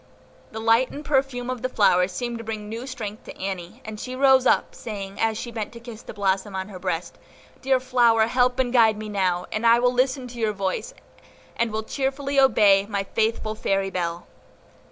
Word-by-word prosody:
The 220 - -6
light 230 +3 +3
and 295 +1 -8
perfume 265 -3 0
of 250 -2 -5
the 255 - -1
flower 180 -6 +3
seemed 235 +5 -4
to - - -7
bring 215 -2 -5
new 230 +4 -6
strength 220 -5 -6
to - - -10
Annie, 185 -3 -5
and 215 -1 -7
she 255 +2 -5
rose 265 -1 +5
up, - - +2
saying, 200 -4 -7
as 225 -1 +1
she 240 - -5
bent 220 -2 -4
to 235 - -9
kiss 235 -1 -10
the - - -9
blossom 195 0 -1
on 190 +1 -4
her 185 -3 -9
breast, 180 -2 -4 0.4
"Dear 265 -1 +2
flower, 240 -3 +3
help 250 +1 +2
and 255 -2 0
guide 225 -3 +5
me 215 0 -6
now, 185 -3 0
and 215 - -2
I 230 0 +6
will 245 +1 +2
listen 255 +1 0
to 240 0 -9
your 220 -2 +1
voice, 200 - -3 0.6
and 235 -1 0 0.2
cheerfully 275 0 -1
obey 205 -7 +5
my 200 -2 -2
faithful 220 +1 -1
fairy 195 -2 -1
bell." 170 -2 -3
225 Hz, 200 wpm, -24 LUFS, 200-250 Hz, 0.6 s, I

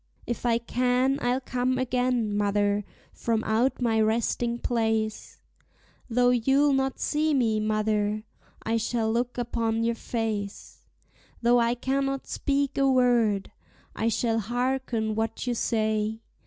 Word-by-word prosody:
If 240 +1 -3
I 230 -1 +3
can, 250 +3 +1
I'll 245 +1 +1
come 255 0 -1
again, 250 -4 0
mother, 205 0 +1 0.3
from 225 -1 -1
out 230 +5 +1
my 225 -2 +2
resting 235 +2 0
place; 220 -3 -1 0.7
Though 245 +1 +3
you'll 270 +4 +3
not 270 0 0
see 305 0 +1
me, 225 -5 +2
mother, 215 0 0 0.4
I 225 +1 0
shall 225 0 0
look 245 +1 -1
upon 230 -2 -1
your 235 0 +1
face; 220 -3 -4 0.6
Though 240 +1 +5
I 235 +1 +2
cannot 270 +2 -1
speak 280 -1 -1
a 275 0 +4
word, 235 -6 +2 0.4
I 225 - -1
shall 225 0 +1
harken 240 -1 -1
what 225 +2 -2
you 245 - 0
say. 220 -1 0
235 Hz, 130 wpm, -26 LUFS, 220-250 Hz, 0.7 s, Though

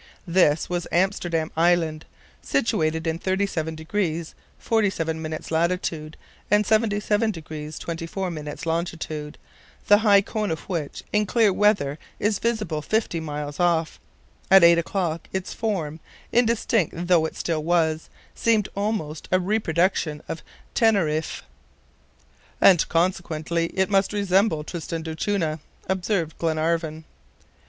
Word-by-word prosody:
This 170 -4 +3
was 175 -1 -2
Amsterdam 175 -3 0
Island, 165 -2 +2 0.4
situated 160 - 0
in 160 0 -1
37 185 -4 -1
degrees 165 0 -2 0.2
47 180 -8 0
minutes 155 0 -5
latitude 165 -2 -1 0.3
and 210 +1 +4
77 215 0 +2
degrees 155 -4 -6
24 170 +3 -4
minutes 150 -2 -6
longitude, 160 -2 -3 0.5
the 205 0 +6
high 205 -2 +6
cone 210 +1 -3
of 160 - -2
which 165 -6 -4
in 210 0 +2
clear 220 -2 +3
weather 185 -9 +2 0.2
is 210 -1 0
visible 215 -9 -1
fifty 215 -1 0
miles 150 -2 -5
off. 170 -2 +1 0.5
At 190 -2 +8
eight 170 0 +7
o'clock, 170 -2 -2
its 190 0 -3
form, 170 -9 -2 0.3
indistinct 230 -5 +2
though 170 -3 +4
it - - -11
still 160 -3 -2
was, 160 -1 +1 0.2
seemed 220 -3 +1
almost 200 -7 -3
a 185 - +4
reproduction 180 -5 0
of 160 - -5 0.3
Teneriffe. 170 -9 +1 1.2
"And 180 -4 +5
consequently 170 -1 0
it 190 +3 -1
must 195 +1 +2
resemble 195 -4 +2
Tristan 165 0 -5
d'Acunha," 160 0 -1 0.3
observed 185 -3 -1
Glenarvan. 160 0 -1
170 Hz, 120 wpm, -24 LUFS, 160-200 Hz, 1.2 s, At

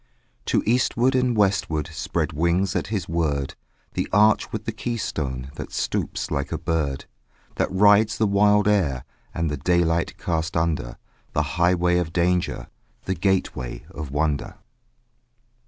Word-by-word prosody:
To - - +1
eastward 125 +2 +2
and 125 -2 +1
westward 95 -7 +1
Spread 70 - -2
wings 85 +4 +1
at - - -1
his 100 -5 -3
word 75 -5 -1 0.4
The - - -2
arch 105 +1 +4
with - - -5
the - - -1
key 120 -1 -3
stone 65 - -4
That - - -6
stoops - - -2
like 70 -2 -2
a - - -1
bird; 75 -5 -2 0.5
That - - 0
rides 105 +3 +5
the 110 - +2
wild 105 +1 +4
air 80 -12 +1 0.3
And 80 -2 -2
the 75 - -2
daylight 85 +1 +1
cast 85 0 -2
under; 80 -7 -1 0.4
The 75 - +2
highway 90 0 +3
of 85 -2 -3
danger, 90 0 0 0.4
The 95 - 0
gateway 90 -9 -1
of 75 -1 -6
wonder. 75 0 -1
85 Hz, 145 wpm, -24 LUFS, 75-100 Hz, 0.5 s, rides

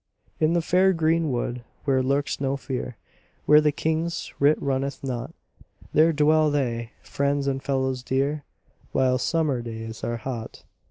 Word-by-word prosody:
In 155 +1 +3
the 170 -1 +1
fair 185 +3 +4
green 165 -2 +1
wood 120 0 -2 0.2
where 135 -2 +3
lurks 140 +2 0
no 135 0 0
fear, 125 -3 -5 0.5
Where 150 0 +7
the 150 -1 +3
King's 160 +3 -2
writ 145 +2 +4
runneth 140 0 -2
not, 125 -3 -4 0.6
There 160 +2 +5
dwell 155 0 +3
they, 120 -5 -2
friends 140 0 -1
and 135 -1 -1
fellows 130 -2 -1
dear, 140 +3 -1 0.5
While 130 -1 +2
summer 155 -7 0
days 115 -1 -7
are 120 0 -2
hot. 115 -1 -6
140 Hz, 150 wpm, -25 LUFS, 130-155 Hz, 0.6 s, Where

